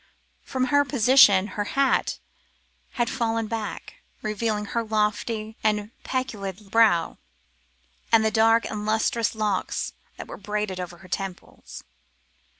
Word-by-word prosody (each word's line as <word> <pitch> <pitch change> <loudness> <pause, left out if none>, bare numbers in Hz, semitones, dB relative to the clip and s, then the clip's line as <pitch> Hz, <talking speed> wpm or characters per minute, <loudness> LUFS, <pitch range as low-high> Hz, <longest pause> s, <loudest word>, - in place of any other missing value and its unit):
From 260 -1 -2
her 285 0 +6
position 250 -7 +5
her 205 +2 -3
hat 275 -1 +2 0.8
had 240 -2 0
fallen 230 -3 -1
back, 215 -2 -5 0.3
revealing 215 0 -1
her 230 +3 -2
lofty 215 0 -1
and 210 0 0
pellucid 205 -6 -4
brow, 220 -8 +3 0.9
and 225 -1 +5
the 220 - +2
dark 225 +1 +4
and 210 -1 -4
lustrous 220 +1 0
locks 210 -3 -1 0.2
that - - -8
were - - -8
braided 210 -2 -3
over 175 -1 -6
her 185 - -15
temples. 185 0 -7
215 Hz, 125 wpm, -25 LUFS, 205-230 Hz, 0.9 s, her